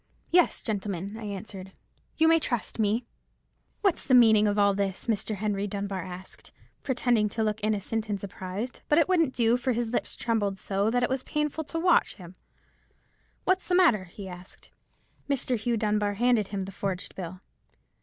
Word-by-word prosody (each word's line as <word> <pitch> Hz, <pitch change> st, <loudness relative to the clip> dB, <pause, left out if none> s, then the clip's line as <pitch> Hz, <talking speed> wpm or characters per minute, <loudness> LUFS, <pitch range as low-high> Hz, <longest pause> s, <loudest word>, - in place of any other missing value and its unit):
"'Yes, 355 Hz, 0 st, +3 dB
gentlemen,' 200 Hz, -2 st, -3 dB
I 225 Hz, -1 st, -7 dB
answered, 195 Hz, -2 st, -7 dB, 0.4 s
'you 320 Hz, -, +4 dB
may 330 Hz, 0 st, +6 dB
trust 240 Hz, -6 st, -2 dB
me.' 220 Hz, +3 st, +1 dB, 0.8 s
"'What's 390 Hz, -5 st, +2 dB
the 260 Hz, -, +4 dB
meaning 220 Hz, -3 st, +6 dB
of 205 Hz, 0 st, 0 dB
all 200 Hz, -1 st, +4 dB
this?' 195 Hz, -1 st, -2 dB
Mr. 220 Hz, -1 st, -1 dB
Henry 205 Hz, 0 st, -1 dB
Dunbar 200 Hz, -1 st, -3 dB
asked, 185 Hz, +1 st, -10 dB, 0.3 s
pretending 245 Hz, -5 st, +1 dB
to 220 Hz, +2 st, -2 dB
look 215 Hz, 0 st, -2 dB
innocent 215 Hz, +1 st, -1 dB
and 205 Hz, -1 st, -1 dB
surprised; 195 Hz, +4 st, -6 dB
but 295 Hz, -, +4 dB
it 330 Hz, -, +5 dB
wouldn't 330 Hz, -7 st, +2 dB
do, 235 Hz, 0 st, +3 dB
for 255 Hz, +1 st, 0 dB
his 235 Hz, 0 st, -1 dB
lips 240 Hz, -, -2 dB
trembled 210 Hz, -4 st, -1 dB
so, 195 Hz, +2 st, 0 dB
that 245 Hz, +2 st, +1 dB
it -, -, +1 dB
was 265 Hz, -1 st, 0 dB
painful 300 Hz, +3 st, -2 dB
to 330 Hz, -, -4 dB
watch 350 Hz, 0 st, +3 dB
him. 180 Hz, -2 st, -12 dB, 1.1 s
'What's 375 Hz, 0 st, +1 dB
the 360 Hz, -, +2 dB
matter?' 280 Hz, -, +4 dB
he 190 Hz, +2 st, -10 dB
asked. 180 Hz, 0 st, -12 dB, 0.6 s
"Mr. 260 Hz, -2 st, 0 dB
Hugh 235 Hz, +1 st, -1 dB
Dunbar 210 Hz, -1 st, 0 dB
handed 235 Hz, -2 st, +2 dB
him 195 Hz, -2 st, -3 dB
the 195 Hz, -, -8 dB
forged 195 Hz, -2 st, -4 dB
bill. 180 Hz, 0 st, -7 dB
215 Hz, 175 wpm, -27 LUFS, 200-245 Hz, 1.1 s, may